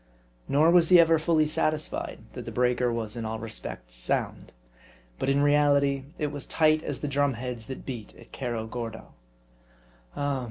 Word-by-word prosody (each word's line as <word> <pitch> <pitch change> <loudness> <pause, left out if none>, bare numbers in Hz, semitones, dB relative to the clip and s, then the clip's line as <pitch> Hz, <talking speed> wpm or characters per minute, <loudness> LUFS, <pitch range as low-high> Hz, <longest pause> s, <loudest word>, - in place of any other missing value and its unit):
Nor 155 +4 +4
was 170 -2 +5
he 180 -1 +8
ever 165 -1 +5
fully 160 -1 +3
satisfied, 155 0 -1
that - - -7
the - - -6
breaker 125 0 +1
was 115 -1 -4
in 115 - -4
all 110 0 -3
respects 110 - -7
sound. - - -2 0.7
But 135 - 0
in 140 +1 +3
reality 140 -2 +3
it 150 -2 -2
was 145 -2 -7
tight 155 -1 +3
as 145 - -4
the 150 - -2
drum 140 -1 +1
heads 120 -2 -6
that 130 - -7
beat 120 -5 -7
at 115 - -14
Cerro 120 -4 -3
Gordo. 115 -1 -7 1.0
Oh! 145 -1 0
135 Hz, 170 wpm, -27 LUFS, 115-150 Hz, 1.0 s, he